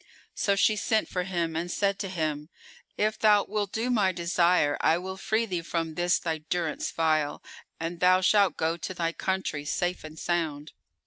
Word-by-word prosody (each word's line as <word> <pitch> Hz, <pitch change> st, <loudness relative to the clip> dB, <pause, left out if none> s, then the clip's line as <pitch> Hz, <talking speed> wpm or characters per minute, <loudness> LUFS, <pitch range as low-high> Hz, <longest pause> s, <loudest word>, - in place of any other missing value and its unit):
So 200 Hz, -, +1 dB
she 215 Hz, +2 st, +3 dB
sent 220 Hz, +1 st, +1 dB
for 180 Hz, -1 st, -2 dB
him 170 Hz, -3 st, -2 dB
and 170 Hz, +2 st, -2 dB
said 200 Hz, +2 st, 0 dB
to 195 Hz, -, -3 dB
him, 155 Hz, -4 st, -3 dB, 0.5 s
"If 215 Hz, +1 st, 0 dB
thou 210 Hz, -2 st, +5 dB
wilt 205 Hz, -1 st, -2 dB
do 235 Hz, +3 st, -1 dB
my 205 Hz, -6 st, +3 dB
desire, 170 Hz, -3 st, +2 dB
I 165 Hz, -, +4 dB
will 190 Hz, +2 st, -5 dB
free 220 Hz, +4 st, 0 dB
thee 180 Hz, -5 st, -3 dB
from 165 Hz, -1 st, -3 dB
this 175 Hz, +2 st, +2 dB
thy 160 Hz, -2 st, -3 dB
durance 160 Hz, 0 st, -2 dB
vile 155 Hz, -2 st, 0 dB, 0.4 s
and 165 Hz, +1 st, -4 dB
thou 185 Hz, +1 st, +5 dB
shalt 195 Hz, -3 st, +3 dB
go 165 Hz, +1 st, 0 dB
to 185 Hz, +3 st, -6 dB
thy 165 Hz, -1 st, -1 dB
country, 190 Hz, -5 st, -2 dB
safe 175 Hz, +4 st, -2 dB
and 155 Hz, 0 st, -10 dB
sound." 155 Hz, -4 st, -2 dB
175 Hz, 185 wpm, -27 LUFS, 160-195 Hz, 0.5 s, thou